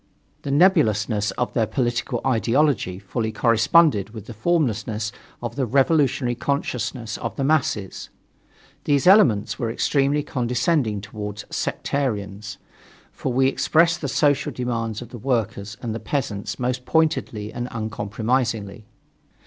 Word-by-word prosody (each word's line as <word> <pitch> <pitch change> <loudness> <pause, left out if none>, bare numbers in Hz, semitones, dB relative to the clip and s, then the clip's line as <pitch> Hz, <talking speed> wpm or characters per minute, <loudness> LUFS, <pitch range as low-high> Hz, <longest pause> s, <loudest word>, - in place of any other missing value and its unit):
The - - -5
nebulousness 115 - +3
of 125 - -1
their 115 -2 +1
political 120 0 -1
ideology 125 -5 +1
fully 110 +3 -3
corresponded 115 - +3
with 110 -2 -8
the 120 - -8
formlessness 110 - 0 0.3
of 120 -1 -4
the 135 -3 -1
revolutionary 135 -1 +2
consciousness 125 -2 -3
of 115 -3 -4
the 135 - -2
masses. 140 -9 0 0.8
These 140 -2 +2
elements 180 - +5
were 115 - -1
extremely 140 +4 +1
condescending 125 - 0
toward 105 0 -6
us - - -7
"Sectarians," 105 -6 -3 0.5
for 130 - -4
we 130 +2 +3
expressed 165 +5 +2
the 145 - -2
social 145 +1 +2
demands 115 -2 -3
of 120 - -13
the 120 - -9
workers 105 -5 -2
and 115 -2 -2
the 115 - -4
peasants 105 -4 -3
most 125 0 -2
pointedly 155 -10 0
and 120 0 -4
uncompromisingly. 110 -1 -2
120 Hz, 130 wpm, -23 LUFS, 105-140 Hz, 0.8 s, elements